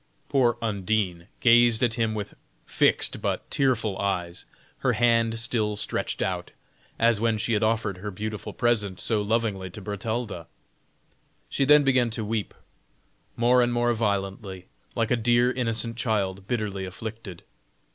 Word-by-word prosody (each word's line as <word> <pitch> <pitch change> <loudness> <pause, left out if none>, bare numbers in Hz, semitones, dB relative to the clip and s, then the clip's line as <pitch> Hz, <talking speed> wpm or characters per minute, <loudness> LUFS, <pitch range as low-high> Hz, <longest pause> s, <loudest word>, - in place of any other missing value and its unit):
Poor 125 -4 +3
Undine 100 -4 -1
gazed 120 0 +5
at 120 -2 +2
him 110 -1 0
with 105 -2 -5 0.3
fixed - - +1
but - - -2
tearful 115 -7 +1
eyes, 90 -3 -2 0.3
her 130 -2 +1
hand 115 0 +2
still 110 -2 0
stretched 105 - -1
out, - - -3 0.5
as 115 -2 +2
when 115 -1 +2
she 115 +2 0
had 105 - +1
offered 110 -4 0
her 105 +2 -5
beautiful 105 +2 -5
present 105 -6 0
so 110 -3 0
lovingly 105 -3 -1
to 90 - -10
Bertalda. 105 -2 -4 1.0
She 140 - +1
then 150 +1 +6
began 130 -3 +3
to 110 -1 -4
weep 110 -1 -3 0.8
more 125 +2 +4
and 120 0 +2
more 120 0 +2
violently, 100 -3 -2 0.3
like 115 -2 0
a - - +5
dear 120 +1 +3
innocent 115 -2 -2
child 100 -5 -1
bitterly 105 -5 -2
afflicted. 100 -1 -8
110 Hz, 145 wpm, -26 LUFS, 100-120 Hz, 1.0 s, then